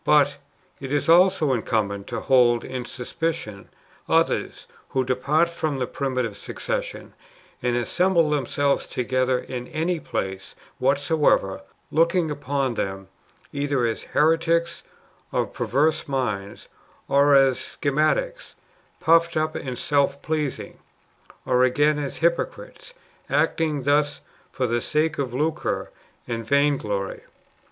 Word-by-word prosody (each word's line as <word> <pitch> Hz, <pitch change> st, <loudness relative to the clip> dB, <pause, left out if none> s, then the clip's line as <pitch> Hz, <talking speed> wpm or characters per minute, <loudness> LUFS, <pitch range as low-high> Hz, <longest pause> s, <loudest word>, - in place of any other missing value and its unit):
But 145 Hz, -1 st, +4 dB, 0.4 s
[It 135 Hz, -1 st, -6 dB
is 145 Hz, -1 st, 0 dB
also 170 Hz, -4 st, +5 dB
Incumbent] 105 Hz, -4 st, -1 dB
to 115 Hz, -2 st, -4 dB
hold 120 Hz, -3 st, +4 dB
in 130 Hz, -1 st, -5 dB
suspicion 125 Hz, -5 st, -4 dB, 0.4 s
others -, -, +1 dB, 0.2 s
who 130 Hz, -1 st, 0 dB
depart 140 Hz, +6 st, +2 dB
from 155 Hz, -4 st, -3 dB
the 130 Hz, -, -1 dB
primitive 130 Hz, -5 st, -2 dB
succession, -, -, -5 dB, 0.5 s
and 120 Hz, -1 st, 0 dB
assemble 170 Hz, +6 st, +2 dB
themselves 140 Hz, 0 st, 0 dB
to 125 Hz, -, -3 dB
gether 130 Hz, +1 st, +1 dB
in 125 Hz, 0 st, -6 dB
any 165 Hz, +2 st, -1 dB
place 95 Hz, -8 st, -5 dB, 0.2 s
whatsoever, 140 Hz, -, +2 dB, 0.3 s
[looking 170 Hz, +2 st, +2 dB
npon 140 Hz, -3 st, -1 dB
them] 95 Hz, -3 st, -4 dB, 0.4 s
either 140 Hz, -3 st, 0 dB
as 115 Hz, -1 st, -2 dB
heretics 165 Hz, +2 st, +1 dB, 0.5 s
of -, -, -1 dB
perverse 150 Hz, +5 st, +1 dB
minds, 105 Hz, -8 st, -3 dB, 0.4 s
or 140 Hz, +1 st, +5 dB
as 135 Hz, -2 st, +4 dB
schismatics 155 Hz, -, -1 dB, 0.4 s
puffed 165 Hz, 0 st, +3 dB
up 155 Hz, 0 st, 0 dB
and 130 Hz, -2 st, -5 dB
self 140 Hz, 0 st, +1 dB
pleasing, 155 Hz, -4 st, -3 dB, 0.7 s
or 125 Hz, 0 st, +3 dB
again 145 Hz, +4 st, +3 dB
as 140 Hz, -2 st, -4 dB
hypocrites, -, -, -2 dB, 0.3 s
acting 155 Hz, -4 st, +1 dB
thus 145 Hz, +1 st, +1 dB, 0.3 s
for 130 Hz, -, -1 dB
the 120 Hz, 0 st, 0 dB
sake 155 Hz, +3 st, 0 dB
of 125 Hz, -3 st, -2 dB
lucre 155 Hz, +3 st, -1 dB, 0.4 s
and 115 Hz, -1 st, -3 dB
vainglory. 115 Hz, -7 st, 0 dB
140 Hz, 120 wpm, -24 LUFS, 125-155 Hz, 0.7 s, also